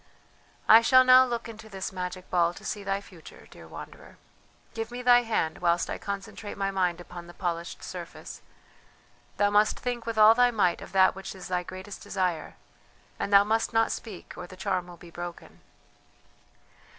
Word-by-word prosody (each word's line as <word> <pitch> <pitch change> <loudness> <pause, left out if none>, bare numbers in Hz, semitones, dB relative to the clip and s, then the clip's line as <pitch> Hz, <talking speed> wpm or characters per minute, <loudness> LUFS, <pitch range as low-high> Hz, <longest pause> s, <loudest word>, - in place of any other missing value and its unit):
"I 225 +1 +9
shall 255 +2 +6
now 255 0 +7
look 235 -1 -4
into 220 -1 -11
this 195 -2 -5
magic 185 0 -6
ball 175 -1 +2
to - - -12
see 205 -1 -4
thy 195 0 -2
future, 180 -5 -15
dear - - -13
wanderer. - - -11 0.6
Give 225 -1 -4
me 245 +1 -7
thy 245 0 +6
hand 215 -9 -1
whilst 175 0 +1
I - - -4
concentrate 200 +1 -6
my 195 0 -1
mind 180 -3 0
upon 175 -1 -10
the 175 - -13
polished 170 -2 -4
surface; - - -8 1.0
thou 205 0 +2
must 210 +1 +3
think 245 -2 -4
with 230 -1 -3
all 215 +1 +8
thy 245 +1 +4
might 205 -7 +1
of - - -10
that 190 -1 +5
which 195 +1 -8
is 185 -1 -9
thy 180 -1 0
greatest 185 +2 -9
desire, 180 -5 -2 0.6
and 200 - -3
thou 200 0 +7
must 225 +2 0
not 225 0 +3
speak 205 -6 -7
or 180 - -8
the 185 - -13
charm 185 -2 -2
will 175 -1 -12
be 170 0 -14
broken." 175 0 -9
195 Hz, 185 wpm, -27 LUFS, 180-225 Hz, 1.0 s, I